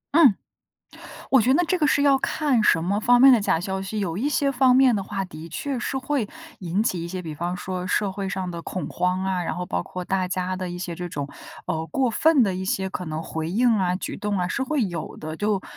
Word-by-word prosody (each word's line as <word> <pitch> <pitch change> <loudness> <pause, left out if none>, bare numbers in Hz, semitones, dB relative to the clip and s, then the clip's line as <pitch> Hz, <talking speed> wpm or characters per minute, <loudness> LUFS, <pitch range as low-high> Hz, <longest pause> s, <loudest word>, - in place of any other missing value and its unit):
嗯， 275 - +7 1.0
我 265 - +6
觉 255 +5 +3
得 350 - +4
这 370 +1 0
个 300 - +3
是 285 - +2
要 275 -2 +5
看 275 -4 +1
什 165 -4 +4
么 200 +4 0
方 245 +2 +4
面 270 -1 +9
的 235 - +5
假 165 -4 +1
消 190 0 -3
息， 205 +2 -4
有 180 -2 -2
一 280 +6 0
些 280 -1 +1
方 255 -1 +4
面 255 -4 +5
的 - - -1
话 195 -1 -3
的 165 -2 -10
确 270 - -3
是 265 - -3
会 265 -4 -1 0.3
引 185 +3 -1
起 180 -6 -1
一 - - -4
些 180 +1 -5
比 160 -2 -6
方 175 +3 -3
说 180 0 -4
社 200 +1 0
会 195 0 -4
上 190 -2 -3
的 170 -1 -6
恐 185 - -4
慌 180 +1 -1
啊， 185 -2 -1
然 165 - -3
后 180 - -3
包 90 - -2
括 180 -1 -6
大 190 -1 0
家 185 0 -2
的 185 -1 -4
一 175 - -5
些 175 -2 -5
这 175 0 -5
种， 145 -3 -4 0.4
呃， 160 -2 -2
过 250 - 0
分 300 +3 +4
的 195 -3 +1
一 185 +1 -4
些 190 0 -1
可 180 - -4
能 155 0 -4
回 160 0 -4
应 235 +6 +3
啊， 180 -2 +1
举 185 - -4
动 205 -1 -2
啊， 180 - -1
是 265 - -1
会 275 -1 0
有 175 -4 -5
的。 155 +1 -6
就 205 0 0
190 Hz, 275 characters per minute, -24 LUFS, 180-245 Hz, 1.0 s, 面